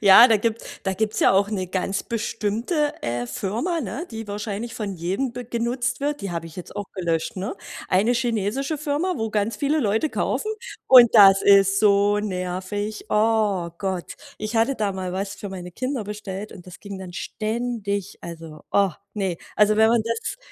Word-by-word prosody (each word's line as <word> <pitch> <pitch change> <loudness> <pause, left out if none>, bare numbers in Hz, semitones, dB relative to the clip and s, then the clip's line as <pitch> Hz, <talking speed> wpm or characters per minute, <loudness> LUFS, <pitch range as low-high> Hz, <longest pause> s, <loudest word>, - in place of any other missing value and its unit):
Ja, 210 +5 +9
da 225 - +5
gibt 225 +2 -1 0.2
da 190 - 0
gibt's 215 +2 -1
ja - - +5
auch 200 +2 +3
'ne 190 -4 -2
ganz 190 +2 -2
bestimmte, 230 - -1
äh, 120 +1 -2
Firma, 230 - -2
ne? 265 - -5
Die 225 -1 -6
wahrscheinlich 210 +2 -4
von 205 -3 -4
jedem 190 +9 -2
be 245 0 -6
genutzt 240 +1 -2
wird. 290 +1 -1
Die 195 - -4
habe 165 -1 -4
ich 165 - -13
jetzt 180 - -9
auch 205 - -4
gelöscht, 170 -3 -2
ne. 200 - -4 0.3
Eine 200 +6 +3
chinesische 240 +5 -1
Firma, 305 +5 -1
wo 225 -1 -2
ganz 210 +1 0
viele 290 +5 +1
Leute 220 +5 +1
kaufen 430 - -1 0.4
und 250 -2 +9
das 195 -3 +8
ist 195 0 +5
so 205 0 +4
nervig. 195 +2 -3
Oh 210 -5 +2
Gott, 190 -3 -3 0.2
ich 215 +2 -3
hatte 230 +5 +3
da 210 -5 -1
mal 185 -1 -4
was 195 +1 -3
für 205 - -7
meine 180 -2 -7
Kinder 255 -1 -3
bestellt 210 0 -6
und 180 - -13
das 180 - -12
ging 200 -2 -7
dann 185 -2 -8
ständig. 215 -1 -3
Also, 165 -2 -9
oh, 200 -1 +4 0.2
ne. 190 -5 -1 0.2
Also 210 0 +4
wenn 220 0 +6
man 235 -1 +3
das 230 +1 -3
210 Hz, 185 wpm, -23 LUFS, 190-230 Hz, 0.4 s, Ja